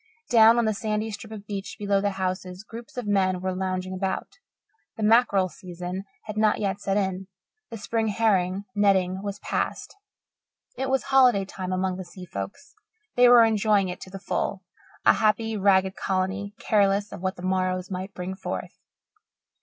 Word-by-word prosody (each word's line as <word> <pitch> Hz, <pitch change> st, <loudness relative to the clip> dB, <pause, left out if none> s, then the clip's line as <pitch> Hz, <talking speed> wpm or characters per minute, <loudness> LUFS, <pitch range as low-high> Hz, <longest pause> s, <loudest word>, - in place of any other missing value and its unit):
Down 230 Hz, 0 st, +7 dB
on 235 Hz, -, +3 dB
the 215 Hz, -, +1 dB
sandy 215 Hz, +1 st, -2 dB
strip 215 Hz, +1 st, -8 dB
of 210 Hz, -2 st, -8 dB
beach 200 Hz, -1 st, -5 dB
below 200 Hz, -2 st, +1 dB
the 205 Hz, -, +1 dB
houses 185 Hz, 0 st, -3 dB
groups 230 Hz, +2 st, -11 dB
of 245 Hz, -, -3 dB
men 190 Hz, -3 st, +2 dB
were 185 Hz, 0 st, -2 dB
lounging 185 Hz, 0 st, -3 dB
about. 190 Hz, -, -3 dB, 0.6 s
The 220 Hz, -, -3 dB
mackerel, 210 Hz, -4 st, +4 dB
season 180 Hz, +2 st, -7 dB, 0.2 s
had 215 Hz, -1 st, -7 dB
not 215 Hz, -1 st, +3 dB
yet 200 Hz, -1 st, -2 dB
set 195 Hz, 0 st, 0 dB
in; 190 Hz, -1 st, -1 dB, 0.4 s
the 230 Hz, -, -6 dB
spring 225 Hz, +2 st, -1 dB
herring 195 Hz, -3 st, +1 dB
netting 190 Hz, -2 st, +2 dB
was 200 Hz, 0 st, -4 dB
past. -, -, -3 dB, 0.8 s
It 265 Hz, 0 st, -2 dB
was 265 Hz, 0 st, +1 dB
holiday 255 Hz, -7 st, +4 dB
time 185 Hz, -1 st, -6 dB
among 185 Hz, 0 st, -1 dB
the 190 Hz, -, -5 dB
sea 180 Hz, +1 st, -11 dB
folks. 100 Hz, -, -7 dB, 0.4 s
They 245 Hz, 0 st, +7 dB
were 240 Hz, -1 st, +8 dB
enjoying 210 Hz, -3 st, +2 dB
it 180 Hz, -, -6 dB
to -, -, -9 dB
the 195 Hz, -, -7 dB
full, 195 Hz, 0 st, -2 dB, 0.4 s
a -, -, +8 dB
happy, 220 Hz, +1 st, +1 dB
ragged 190 Hz, -1 st, +3 dB
colony, 195 Hz, +2 st, -2 dB
careless 200 Hz, -1 st, +2 dB
of -, -, -8 dB
what 185 Hz, 0 st, -1 dB
the 175 Hz, -, -10 dB
morrows 185 Hz, 0 st, -1 dB
might 190 Hz, +2 st, -5 dB
bring 180 Hz, +1 st, -4 dB
forth. -, -, -6 dB
195 Hz, 175 wpm, -25 LUFS, 185-215 Hz, 0.8 s, were